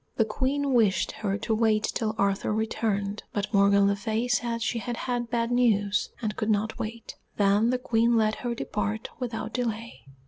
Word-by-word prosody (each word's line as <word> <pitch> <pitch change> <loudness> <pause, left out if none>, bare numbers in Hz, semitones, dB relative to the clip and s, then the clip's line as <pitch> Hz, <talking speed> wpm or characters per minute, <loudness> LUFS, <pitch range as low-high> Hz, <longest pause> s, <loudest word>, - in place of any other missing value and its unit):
The 225 - +3
Queen 270 +5 -1
wished 210 -7 +3
her 205 -2 -2
to 220 - -2
wait 215 -1 +2
till 220 -2 -1
Arthur 200 +1 +1
returned, 210 -2 -1
but 205 +1 -2
Morgan 200 0 +5
le 200 0 +3
Fay 220 +3 -2
said 240 -1 0
she 235 - -1
had 240 +1 -4
had 245 -2 -2
bad 235 0 0
news 210 -5 +2
and 210 -1 -1
could 215 - -2
not 215 +1 0
wait. 225 +1 -6 0.2
Then 205 +3 +3
the 255 - +2
Queen 235 -1 +2
let 215 -1 +2
her 240 -1 -3
depart 215 0 -3
without 225 -3 -4
delay. 230 -2 -3
220 Hz, 180 wpm, -27 LUFS, 210-235 Hz, 0.2 s, Morgan